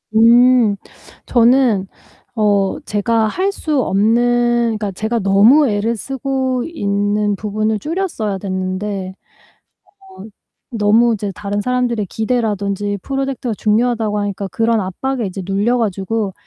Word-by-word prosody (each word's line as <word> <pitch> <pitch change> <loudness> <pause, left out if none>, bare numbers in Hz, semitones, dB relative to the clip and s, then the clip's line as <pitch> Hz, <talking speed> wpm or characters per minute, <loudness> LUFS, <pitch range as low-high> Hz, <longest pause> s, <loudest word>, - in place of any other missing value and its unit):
음. 235 -1 +5 0.5
저는 235 -5 +3 0.5
어 205 0 +1
제가 220 +2 0
할 375 - -1
수 305 -8 -1
없는 240 +2 +2
그러니까 210 -2 -3
제가 220 +5 -2
너무 220 +9 +5
애를 215 +3 -1
쓰고 260 +1 -2
있는 205 -7 -1
부분을 215 +1 -2
줄였어야 305 - -3
됐는데 190 0 -4 0.9
어 380 - -14 0.5
너무 225 +1 +3
이제 205 -1 -4
다른 205 0 -3
사람들의 245 -3 -1
기대라던지 205 -3 -2
프로젝트가 270 -3 -3
중요하다고 220 0 0
하니까 200 -1 -3
그런 225 +1 +1
압박에 230 +6 -3
이제 190 0 -6
눌려 205 +6 0
가지고 205 -1 -2
220 Hz, 275 characters per minute, -17 LUFS, 205-245 Hz, 0.9 s, 음